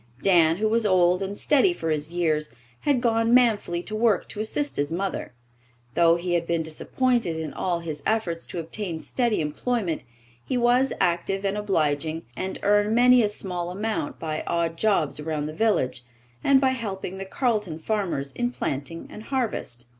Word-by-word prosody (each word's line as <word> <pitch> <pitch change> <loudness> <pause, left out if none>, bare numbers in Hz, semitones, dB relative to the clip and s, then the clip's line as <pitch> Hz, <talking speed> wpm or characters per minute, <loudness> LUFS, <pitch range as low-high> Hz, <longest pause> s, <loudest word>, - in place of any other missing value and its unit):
Dan, 170 -4 +5
who 215 +2 +1
was 230 +1 +2
old 180 -2 +3
and 195 +1 -3
steady 300 +5 +3
for 165 - -3
his 150 +1 -2
years, 155 -6 0 0.2
had 280 -4 +1
gone 230 0 +3
manfully 210 -8 +2
to 215 - -5
work 220 -3 +2
to - - -7
assist 285 +7 -1
his 145 +2 0
mother. 190 +3 -3 0.6
Though 170 +2 +5
he 175 +1 -2
had 170 -1 0
been 170 -1 0
disappointed 220 +4 0
in 160 -3 -4
all 175 -2 -1
his 155 -3 -5
efforts 175 -6 -1
to - - -7
obtain 170 +1 -4
steady 240 -4 0
employment, 170 +4 -2 0.4
he 255 - -1
was 245 +2 +3
active 185 +2 0
and 195 +1 0
obliging, 160 -6 0
and 190 +6 -4
earned 205 +2 +3
many 250 +1 +6
a 210 - +2
small 180 -4 -4
amount 205 -3 -3
by 155 -1 -3
odd 170 -1 0
jobs 170 -7 +1
around 150 -1 -2
the 155 - -5
village, 130 - +1 0.4
and 275 -1 +5
by 265 -1 +3
helping 195 -6 -4
the 195 - -4
Carleton 210 - -1
farmers 165 -6 -2
in 245 - -1
planting 165 - -4
and 215 - -9
harvest. 225 - -3
190 Hz, 175 wpm, -25 LUFS, 165-225 Hz, 0.6 s, many